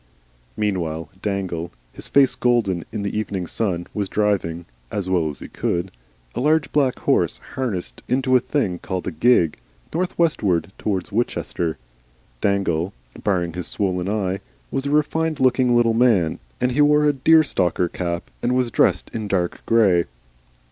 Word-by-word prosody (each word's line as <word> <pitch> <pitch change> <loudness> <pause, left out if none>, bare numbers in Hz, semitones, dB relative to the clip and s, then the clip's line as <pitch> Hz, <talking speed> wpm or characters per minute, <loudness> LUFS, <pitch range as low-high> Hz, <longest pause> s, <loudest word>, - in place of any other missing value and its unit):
Meanwhile 85 -7 -2
Dangle, 95 -5 -2 0.2
his - - -8
face 140 -1 +4
golden 115 -8 +1
in 105 -2 -3
the 100 - -3
evening 100 -4 -2
sun, 90 -2 -2
was 100 -3 -2
driving 95 -5 0 0.2
(as 100 -3 -3
well 90 -4 +1
as 75 - -7
he - - -7
could) 90 +2 -2 0.4
a - - -3
large, 150 +3 +2
black 135 -4 +2
horse - - +1 0.2
harnessed 95 - -3
into 130 0 +2
a - - +7
thing 105 -9 -1
called 95 -1 -4
a - - -2
gig, 85 -2 +3 0.4
northwestward 155 - +1
towards 95 -2 -2
Winchester. 95 -6 -1 0.6
Dangle, 95 -3 0 0.3
barring 90 -4 0
his 90 0 -4
swollen 95 -2 -1
eye, 100 -2 -1 0.3
was 135 +1 -2
a - - -1
refined 155 +2 +1
looking 130 -1 +3
little 120 -1 +4
man, 110 -9 +3 0.2
and 125 0 +1
he 140 +4 +2
wore 150 0 +5
a 145 - +4
deerstalker 130 - +3
cap 85 0 -4
and 125 +1 +1
was 125 -2 +1
dressed - - +2
in 110 -2 -3
dark 90 -3 -1
grey. 100 -7 +4
100 Hz, 155 wpm, -22 LUFS, 90-125 Hz, 0.6 s, a